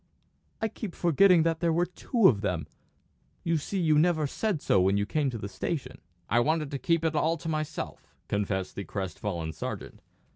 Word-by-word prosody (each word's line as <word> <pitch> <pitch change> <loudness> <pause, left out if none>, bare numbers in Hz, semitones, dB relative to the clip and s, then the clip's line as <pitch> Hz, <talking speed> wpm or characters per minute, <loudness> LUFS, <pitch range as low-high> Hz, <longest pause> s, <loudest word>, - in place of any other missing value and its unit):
I 220 - 0
keep 215 -3 -7
forgetting 175 0 +5
there 165 0 +1
were 170 +2 +2
two 195 +4 +2
of 105 -5 +3
them; 90 -6 -1 0.8
you 165 -1 +1
see 190 +6 -3
you 155 -3 +4
never 160 -2 +3
said 195 +4 -1
so 95 - +3
when 95 +2 +3
you 100 - +1
came 145 +5 0
to 120 - -4
the 100 - -5
station." 130 - -4 0.3
"I 120 - +3
wanted 155 +3 +1
to 140 - -3
keep 165 +2 +1
it 160 - +1
all 160 +2 +1
to 155 - -8
myself," 155 -1 -4
confessed 100 -2 -1
the 100 - -5
crest 95 -2 -5
fallen 85 -6 -3
sergeant. 75 - -6
155 Hz, 190 wpm, -28 LUFS, 100-165 Hz, 0.8 s, forgetting